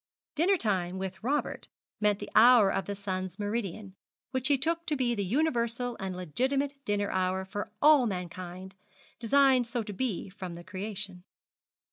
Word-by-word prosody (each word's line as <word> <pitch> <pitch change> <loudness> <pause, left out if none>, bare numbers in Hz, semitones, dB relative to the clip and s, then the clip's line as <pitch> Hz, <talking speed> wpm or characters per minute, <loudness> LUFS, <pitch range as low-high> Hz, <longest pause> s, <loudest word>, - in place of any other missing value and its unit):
Dinner 355 +5 +3
time 190 - -1
with 190 0 -5
Robert 285 +5 -1 0.3
meant 210 -1 +2
the - - -8
hour 225 -3 +7
of 195 - -1
the 200 - -3
sun's 185 -2 -4
meridian, 205 -2 -3 0.4
which 260 -1 0
he 285 -1 +4
took 335 +5 -1
to 305 - +1
be 250 -3 +1
the 205 -3 -1
universal 240 - 0
and 190 -2 -4
legitimate 260 - -1
dinner 205 -1 0
hour 185 0 0
for 205 +2 -5
all 295 -5 +7
mankind, 185 0 -6 0.5
designed 260 +1 +4
so 235 -1 -2
to 210 -1 -7
be 225 -2 -2
from 185 -3 -7
the 170 - -9
creation. 190 0 -6
210 Hz, 160 wpm, -29 LUFS, 190-255 Hz, 0.5 s, hour